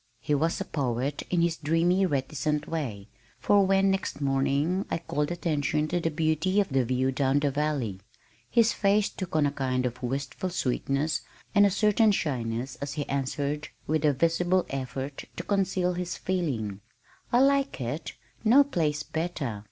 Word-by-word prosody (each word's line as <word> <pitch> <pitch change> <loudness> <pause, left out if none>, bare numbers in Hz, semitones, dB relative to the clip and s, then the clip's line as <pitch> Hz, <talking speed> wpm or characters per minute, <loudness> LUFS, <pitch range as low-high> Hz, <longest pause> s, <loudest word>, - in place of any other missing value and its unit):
He 150 - -1
was 160 +4 +1
a - - -3
poet, 135 0 -2
in 175 -2 +2
his 170 -1 +1
dreamy 170 +5 +2
reticent 150 +1 -1
way, 120 -12 -4 0.3
for 200 +8 +4
when 195 0 +4
next 195 -5 -2
morning 140 +6 +1
I - - 0
called 150 -2 -2
attention 150 -3 0
to 175 - 0
the 165 - 0
beauty 160 +5 +1
of 200 - +1
the 135 -2 +2
view 130 +2 0
down 135 +1 +1
the 145 -1 +1
valley, 140 -9 -1 0.5
his 230 -2 +4
face 205 0 +2
took 185 -4 -6
on 155 -2 +4
a 140 - +1
kind 130 -2 -1
of 125 0 -4
wistful 140 +7 -3
sweetness 140 -1 -1 0.3
and 205 0 +6
a - - +2
certain 210 +2 +3
shyness 125 - -2
as 140 0 -5
he 145 -2 -3
answered 140 +2 -2 0.2
with 155 0 0
a 150 - +5
visible 175 +5 +2
effort 135 +1 -4
to 175 - -5
conceal 190 -2 +1
his 180 0 -4
feeling 125 - -2 0.5
"I 245 - +5
like 275 0 +2
it 140 +2 -4 0.3
No 245 +6 +7
place 155 - -1
better. 160 -10 -3
150 Hz, 165 wpm, -27 LUFS, 135-180 Hz, 0.5 s, No